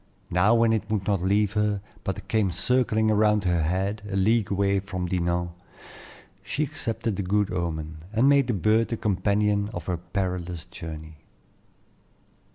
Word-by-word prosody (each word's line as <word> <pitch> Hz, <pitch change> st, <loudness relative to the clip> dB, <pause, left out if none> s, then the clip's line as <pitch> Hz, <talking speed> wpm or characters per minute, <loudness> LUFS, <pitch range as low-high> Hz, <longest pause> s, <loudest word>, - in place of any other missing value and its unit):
Now, 95 Hz, +6 st, +4 dB
when 115 Hz, -1 st, +4 dB
it 110 Hz, -1 st, -2 dB
would 105 Hz, -3 st, -1 dB
not 100 Hz, -4 st, +1 dB
leave 100 Hz, +2 st, +2 dB
her, 105 Hz, -1 st, +1 dB, 0.2 s
but 95 Hz, 0 st, -4 dB
came 110 Hz, -4 st, +1 dB
circling 110 Hz, 0 st, +2 dB
around 105 Hz, -1 st, +3 dB
her 90 Hz, -2 st, +1 dB
head 95 Hz, +6 st, -1 dB
a 95 Hz, -, -3 dB
league 105 Hz, +2 st, +2 dB
away 100 Hz, 0 st, +1 dB
from 90 Hz, -1 st, -4 dB
Dinan, 85 Hz, -1 st, -1 dB, 0.9 s
she 150 Hz, -, -2 dB
accepted 115 Hz, -6 st, -3 dB
the -, -, -1 dB
good 100 Hz, +1 st, 0 dB
omen, 80 Hz, -3 st, -3 dB
and 115 Hz, +4 st, +3 dB
made 140 Hz, -2 st, +4 dB
the 120 Hz, -, +1 dB
bird 110 Hz, +3 st, +2 dB
the 115 Hz, -, -3 dB
companion 100 Hz, +1 st, +1 dB
of 85 Hz, -2 st, -5 dB
her 90 Hz, -2 st, -1 dB
perilous 90 Hz, -1 st, -4 dB
journey. 80 Hz, -3 st, -9 dB
100 Hz, 160 wpm, -26 LUFS, 90-110 Hz, 0.9 s, Now